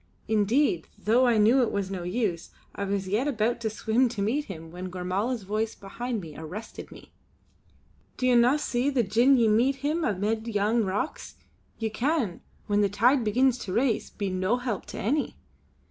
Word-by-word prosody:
Indeed, 215 - +2
though 230 +5 +3
I 235 -2 +3
knew 225 +5 +5
it 240 - +1
was 195 -1 -2
no 190 -2 -4
use, 180 -2 -2 0.2
I 200 - -3
was 195 -1 -2
yet 215 +9 0
about 235 -3 0
to 220 - -1
swim 220 +4 +1
to 220 -4 -4
meet 275 +8 0
him 165 -5 -9
when 180 +2 -6
Gormala's 190 +6 -2
voice 215 +3 -2
behind 230 +3 -5
me 160 -4 -10
arrested 180 +8 -8
me: - - -14 1.1
"Do 255 - -1
ye 255 - +4
no 245 +4 +5
see 260 -2 0
that 240 -8 0
gin 250 +5 +5
ye 230 -2 +4
meet 235 +6 +3
him 320 +3 0
amid 220 0 -1
yon 215 +1 +1
rocks, 200 +10 -3 0.4
ye 220 -1 -2
can, 240 - -1 0.2
when 205 -1 +1
the 200 - +2
tide 240 +6 +3
begins 250 +3 +2
to 185 - -5
race, 240 0 +1
be 200 -2 -4
no 185 +6 +1
help 245 -5 -4
to - - -8
any. 280 +8 -1
220 Hz, 185 wpm, -27 LUFS, 200-245 Hz, 1.1 s, knew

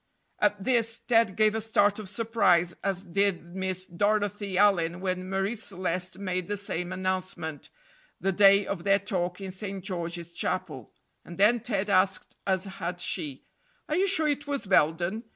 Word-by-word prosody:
At 210 -1 +1
this 230 -1 +2
Ted 230 -4 +2
gave 215 -1 +3
a 220 - -1
start 210 -1 +2
of 205 -3 -7
surprise, 200 -6 +2
as 195 -1 -1
did 180 -2 -1
Miss 185 -1 -2
Dorothy 205 +1 0
Allyn 180 -4 +3
when 185 0 -3
Marie 195 +4 -1
Celeste 185 -3 -4
made 185 -2 -3
the 205 0 -2
same 180 -3 -3
announcement 185 -4 -3 0.5
the 195 - +1
day 200 +1 +6
of 185 -3 -4
their 195 0 +4
talk 185 -2 -2
in 190 -1 -6
St. 195 0 -6
George's 170 -2 -4
Chapel. - - -3 0.3
And 170 - -10
then 215 +5 +5
Ted 210 -4 -2
asked, 190 -1 +1
as 190 0 +1
had 180 -2 -5
she: 155 -7 -3 0.4
"Are 305 - -1
you 380 +3 +3
sure 320 -5 +3
it 290 0 -1
was 280 -5 -2
Belden? 175 +4 +2
195 Hz, 165 wpm, -28 LUFS, 180-210 Hz, 0.5 s, day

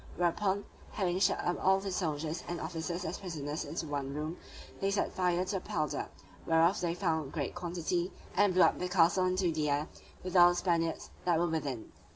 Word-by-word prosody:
Whereupon, 190 +3 +1 0.3
having 185 -3 0
shut - - +3
up 175 - -1
all 190 +1 +5
the 195 0 -4
soldiers 160 -3 -2
and 175 -1 -3
officers 170 +2 -4
as 160 - -4
prisoners 155 -4 -4
into 160 +3 -4
one 140 -2 -3
room, 155 +3 -3 0.4
they 195 - +1
set 200 0 0
fire 180 0 +1
to 195 - -2
the - - -5
powder 155 -3 -2 0.4
(whereof 165 +4 +4
they 170 -1 0
found 160 -6 -1
great 145 -5 -2
quantity) 175 0 -2 0.2
and 205 -1 +4
blew 185 - +7
up 165 - +3
the 180 - -2
castle 180 +1 +4
into 185 -1 +1
the 155 -2 0
air, 145 +2 0 0.3
with 185 0 -5
all 175 -1 +9
the 175 - 0
Spaniards 165 -3 0
that 175 -2 +3
were 170 - +2
within. 145 -8 -3
175 Hz, 195 wpm, -32 LUFS, 160-185 Hz, 0.4 s, all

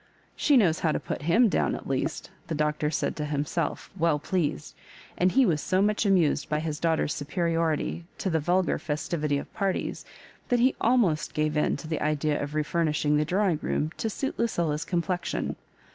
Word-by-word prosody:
*' - - -34
She 290 -2 +4
knows 175 -9 +3
how 160 - +1
to - - 0
put - - -5
him 195 +11 +4
down - - +1
at - - -8
least," - - -2 0.2
the 165 - -2
Doctor 150 0 0
said - - -1
to 150 - -2
himself 150 +3 -2
weU 165 -2 +2
pleased; 160 0 -2 0.4
and 180 +1 +2
he 265 +4 +4
was 155 -7 +1
so 185 - +1
much 210 +1 +2
amused 170 -6 +2
by 150 - +1
his 155 -1 -3
daughter's 160 -2 +1
superiority 165 +1 -1
to 190 - -2
the 160 - +2
vulgar 175 +4 +1
festivity 150 -1 -1
of - - -7
parties, 195 -3 -2 0.5
that 245 - +3
he 255 +3 +4
almost 225 -10 +2
gave 155 0 0
in 150 - +1
to 160 - -9
the 160 -1 -2
idea 150 0 0
of 145 +1 -4
refurnishing 155 -1 +1
the 150 - +2
drawing 185 -1 +1
room 155 +1 -1
to 225 - -1
suit 270 +6 -3
LucUla's 170 -9 0
complexion. 175 0 -2
165 Hz, 190 wpm, -27 LUFS, 150-185 Hz, 0.5 s, She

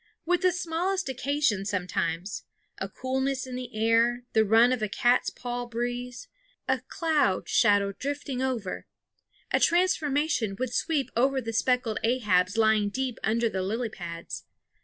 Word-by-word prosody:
With 355 +2 +2
the 365 -1 +4
smallest 360 +1 -1
occasion 265 -5 0
sometimes 180 -1 -2 0.4
a 195 - -3
coolness 265 +4 -2
in 255 - -8
the 250 -2 -7
air, 230 +2 +2
the 220 - +5
run 225 +4 +5
of 250 - -3
a 215 - -1
cat's 240 +5 +2
paw 245 0 -5
breeze, 245 - -4 0.4
a - - +2
cloud 300 - +1
shadow 205 -3 +3
drifting 275 +3 -4
over 245 -8 -3 0.6
a - - +3
transformation 300 - +2
would 255 0 -3
sweep 300 -2 0
over 265 +3 +2
the 225 -2 -5
speckled 245 -1 +1
Ahabs 210 -5 +2
lying 220 -2 +3
deep 255 +2 -3
under 230 +2 +2
the 190 -4 -2
lily 225 +5 -2
pads. 170 -4 -7
245 Hz, 145 wpm, -27 LUFS, 215-270 Hz, 0.6 s, the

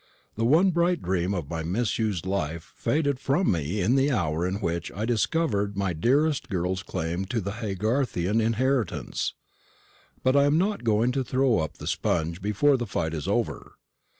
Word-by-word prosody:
The 115 - 0
one 165 +9 +5
bright 175 0 +2
dream 90 +1 0
of 85 -6 -3
my 80 +1 -4
misused 105 +1 -1
life 85 -4 -3
faded 140 -3 0
from 140 +7 +1
me 85 +4 -1
in 105 +8 +2
the 135 +1 +3
hour 85 - 0
in 95 - -2
which 85 -4 -2
I 105 +4 -2
discovered 110 -4 0
my 95 -3 0
dearest 135 - +1
girl's 95 0 -1
claim 85 0 -3
to 115 +5 -2
the 100 -1 -3
Haygarthian 110 -1 0
inheritance. 115 0 0 0.9
But 130 +1 +3
I 140 0 +5
am 145 +2 +3
not 200 +1 0
going 115 +2 +2
to 135 +1 -1
throw 130 -1 +2
up 80 - -3
the - - -8
sponge 85 +2 -1
before 105 +8 +3
the 120 -2 -3
fight 80 -4 -2
is 75 -3 -4
over. - - -2
105 Hz, 175 wpm, -26 LUFS, 90-135 Hz, 0.9 s, one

